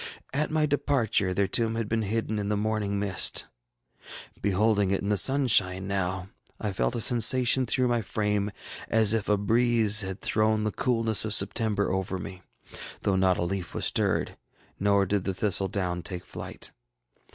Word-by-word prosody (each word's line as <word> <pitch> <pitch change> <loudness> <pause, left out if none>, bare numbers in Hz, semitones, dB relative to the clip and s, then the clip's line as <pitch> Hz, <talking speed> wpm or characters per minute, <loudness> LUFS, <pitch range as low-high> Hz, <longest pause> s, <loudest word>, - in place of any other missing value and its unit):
At 150 +2 0
my 155 -1 +1
departure 135 -9 0
their 100 +2 +1
tomb 115 +3 0
had 115 -2 -2
been 115 +1 -1
hidden 110 +1 -2
in 100 0 -3
the 105 - 0
morning 105 -1 -1
mist. 100 -2 +1 1.0
Beholding 100 0 +1
it 95 - 0
in 100 - -2
the 105 - +2
sunshine 100 -7 +2
now, 95 -1 -2 0.3
I 105 -3 -3
felt 60 -9 -1
a 120 - -1
sensation 125 +2 +3
through 125 +3 +1
my 120 -1 0
frame 105 -1 -1 0.4
as 110 -1 +4
if 110 -3 -1
a 105 - +3
breeze 110 0 +3
had 95 0 -5
thrown 110 0 +1
the 105 - -1
coolness 115 -4 +2
of 110 -1 +1
September 100 +1 +1
over 95 0 -2
me, 95 0 -8 0.6
though 100 - +1
not 95 -1 +2
a - - -1
leaf 90 0 -4
was - - -2
stirred, - - -1 0.4
nor 100 0 +2
did 100 0 -1
the 95 -1 -3
thistle 100 -1 +2
down 90 -2 -3
take 90 +1 -7
flight. - - -8
105 Hz, 175 wpm, -27 LUFS, 95-115 Hz, 1.0 s, as